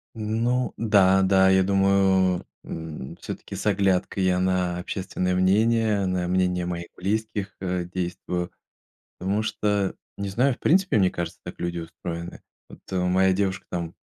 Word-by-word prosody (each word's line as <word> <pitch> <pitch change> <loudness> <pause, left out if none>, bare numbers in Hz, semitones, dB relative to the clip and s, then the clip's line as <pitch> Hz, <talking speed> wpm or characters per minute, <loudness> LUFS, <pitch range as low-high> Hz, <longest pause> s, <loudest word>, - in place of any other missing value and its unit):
Ну 115 +3 0
да, 95 -4 +4
да. 95 0 +5
Я 95 0 +5
думаю, 95 -1 +3 0.2
м, 80 -5 -7
всё-таки - - -7
с - - -6
оглядкой 95 -1 +1
я 90 -1 +2
на 90 -1 +1
общественное 90 -1 -2
мнение, 105 +2 +3
на 90 -1 -1
мнение 90 -1 +1
моих 85 -1 -4
близких, 105 +1 -2
э, 90 -1 -1
действую. 90 0 -3 0.7
Потому 100 +3 0
что, 105 -3 0 0.2
не 100 0 -3
знаю, 125 +7 +2
в - - -12
принципе, 185 - +3
мне 95 -2 +4
кажется, 85 -1 -5
так - - -7
люди 85 0 -2
устроены. 85 +1 -7 0.3
Вот, - - -13
э, 95 - 0
моя 95 +1 +3
девушка, 95 -1 -1
там, 85 -2 -4
95 Hz, 150 wpm, -25 LUFS, 90-100 Hz, 0.7 s, да